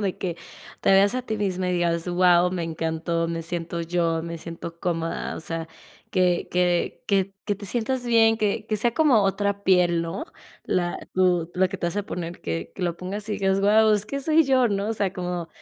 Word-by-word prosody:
De 195 -3 -1
que 175 -3 -3 0.4
te - - +2
veas 200 +3 +5
a 255 - -1
ti 220 -3 -3
misma 185 -3 -1
y - - 0
digas: 170 0 0
"Guau, 180 0 +4
me 180 -2 -2
encantó, 165 +1 -2
me 165 0 -3
siento 170 0 -4
yo, 165 -1 0
me 170 0 -5
siento 165 +1 -8
cómoda". 165 -2 -2
O - - -6
sea, 165 0 -5 0.4
que 180 -2 +1
que 180 -1 0
que 195 -2 +1
que 205 - 0
te 200 +1 -10
sientas 245 +4 -1
bien, 225 -2 +4
que 215 0 -1
que 215 - -1
sea 235 +3 +1
como 265 -7 +4
otra 200 +1 0
piel, 180 -3 +3
¿no? 165 - -4 0.4
La 175 -1 -1 0.2
tu 180 -3 +2
la 185 +1 +3
que 195 - -5
te 175 - -1
vas 170 - -3
a 205 - 0
poner, 175 -3 -6
que 85 0 -4
que 190 - -6
lo 175 -1 -1
pongas 200 +4 -6
y - - -1
digas: 195 -1 +1
"Guau, 215 +2 +5
es 205 -1 +1
que 275 +6 -4
soy 315 +3 +4
yo", 260 -2 +4
¿no? 200 0 -1
O - - 0
sea, 200 -3 -1
como 180 -2 -4
185 Hz, 220 wpm, -24 LUFS, 170-205 Hz, 0.4 s, veas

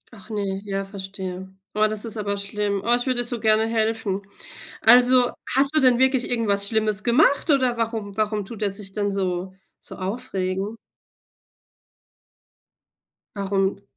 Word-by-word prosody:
Ach 200 +1 -15
ne, 200 -2 -3
ja, 195 -1 -3
verstehe. 190 -1 -7 0.2
Oh, 215 +1 +3
das 215 +1 -4
ist 225 0 -4
aber 200 -1 -2
schlimm. 200 0 -2
Oh, 240 - +3
ich 245 +2 -2
würde 255 -2 +1
dir - - -4
so 240 0 -3
gerne 215 0 +3
helfen. 220 -3 -1 0.6
Also, 245 +2 +6 0.2
hast 275 +3 +4
du 310 - +6
denn 250 -2 +4
wirklich 260 -1 +2
irgendwas 205 -4 +2
Schlimmes 215 -1 +1
gemacht, 280 +6 +3
oder 260 -4 +2
warum 220 -3 -3
warum 210 -2 -1
tut 220 0 -9
er 205 - +1
sich 195 -1 -7
dann 205 -1 -1
so 185 -1 -2 0.3
so - - -10
aufregen? 195 -1 -3 2.6
Warum 195 -1 0
b 200 - -24
210 Hz, 155 wpm, -23 LUFS, 195-235 Hz, 2.6 s, Also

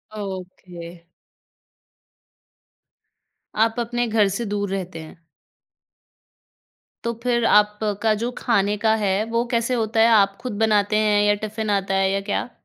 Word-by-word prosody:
Okay. 180 -3 -8 2.5
आप 225 +1 +2
अपने 240 +1 -1
घर 215 -2 +2
से 200 +5 -3
दूर 205 -1 -2
रहते 185 -4 -5
हैं। 160 +1 -11 1.9
तो 235 - -2
फिर 240 -2 +1
आपका 210 +1 +2
जो 240 +1 -2
खाने 205 -3 +1
का 220 +1 +2
है, 205 -1 0
वो 230 +1 0
कैसे 235 +1 0
होता 225 -2 -1
है? 225 - +6
आप 200 -3 +4
खुद 250 -4 -5
बनाते 215 -1 +2
हैं 210 -1 +2
या 205 0 +4
टिफ़िन 215 0 -4
आता 195 -1 0
है 195 0 +2
या 195 0 -1
क्या? 205 +4 -3
210 Hz, 140 wpm, -22 LUFS, 195-225 Hz, 2.5 s, है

